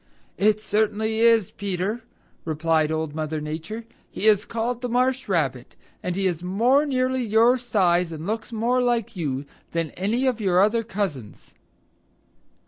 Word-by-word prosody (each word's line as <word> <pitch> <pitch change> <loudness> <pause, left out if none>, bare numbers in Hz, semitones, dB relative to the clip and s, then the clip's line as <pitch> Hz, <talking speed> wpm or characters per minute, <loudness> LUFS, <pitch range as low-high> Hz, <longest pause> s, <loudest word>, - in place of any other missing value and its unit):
"It 215 +1 +3
certainly 220 +1 0
is, 230 -4 +4
Peter," 200 +3 -3 0.4
replied 160 -1 +1
Old 160 -1 -2
Mother 155 0 -3
Nature. 160 +9 -6 0.2
"He - - -4
is 210 -1 +5
called 235 +1 -3
the 250 - -3
Marsh 255 +2 0
Rabbit, - - -1 0.3
and 180 -1 -3
he 195 0 -1
is 175 -3 0
more 240 +11 +2
nearly 255 -1 0
your 230 +3 +4
size, 180 -7 +1
and 160 0 -6
looks 220 +4 -3
more 235 +3 +1
like 235 -3 0
you, 145 -5 -3 0.3
than 165 -3 -1
any 220 +8 -1
of 250 -4 0
your 185 -3 +3
other 215 +4 +3
cousins." 190 - -5
210 Hz, 150 wpm, -24 LUFS, 170-235 Hz, 0.4 s, is